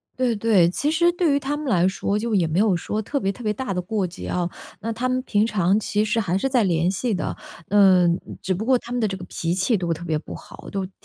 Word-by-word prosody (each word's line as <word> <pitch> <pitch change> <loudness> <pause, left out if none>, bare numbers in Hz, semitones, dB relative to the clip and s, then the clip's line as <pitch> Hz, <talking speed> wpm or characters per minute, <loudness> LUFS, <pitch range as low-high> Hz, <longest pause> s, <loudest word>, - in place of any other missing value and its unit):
对 250 -3 +1
对。 205 -5 +4
其 285 +11 -1
实 340 +2 +3
对 345 -4 +1
于 280 - +2
她 285 +1 -2
们 300 -1 -5
来 185 -6 +3
说 195 +2 -1
就 225 +1 -2
也 180 -5 +3
没 160 +4 0
有 210 -3 +3
说 210 +5 -2
特 280 +7 -2
别 195 -5 0
特 240 - -11
别 210 -1 0
大 210 -2 -3
的 180 - -1
过 205 +1 -1
节 175 - -8
啊， 175 -1 -1 0.3
那 230 - -3
她 240 +3 -2
们 255 0 0
平 210 -4 +2
常 200 -2 +2
其 210 0 0
实 215 +2 0
还 190 -3 0
是 270 +7 0
在 250 -4 +3
联 170 -2 +1
系 205 +5 -1
的， 185 - -2 0.3
嗯， 185 -4 +5 0.2
只 190 - -1
不 210 +5 -3
过 260 -1 +4
她 240 - -11
们 245 - -1
的 220 - +2
这 190 - -3
个 180 - -9
脾 170 -1 -2
气 190 +4 +1
都 170 -2 -1
特 165 +2 -8
别 160 -2 0
不 150 - -8
好， - - -11
都 195 -2 -2
特 185 - -12
205 Hz, 300 characters per minute, -23 LUFS, 180-240 Hz, 0.3 s, 嗯